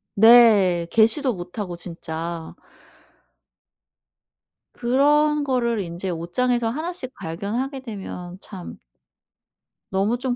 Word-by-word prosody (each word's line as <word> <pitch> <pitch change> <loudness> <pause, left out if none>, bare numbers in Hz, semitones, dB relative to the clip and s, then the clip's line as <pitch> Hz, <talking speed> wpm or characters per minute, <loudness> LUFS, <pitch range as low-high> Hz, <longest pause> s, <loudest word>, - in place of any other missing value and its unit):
네. 210 -6 +6
개시도 240 +4 +3
못하고 180 0 -6
진짜. 165 -1 -6 2.2
그런 295 +4 +2
거를 240 -4 0
인제 175 +2 -5
옷장에서 225 +8 0
하나씩 310 0 -5
발견하게 230 - -4
되면 190 -6 -8
참 190 -4 -9 1.1
너무 200 +5 +1
좀 250 0 -2
220 Hz, 185 characters per minute, -23 LUFS, 175-255 Hz, 2.2 s, 네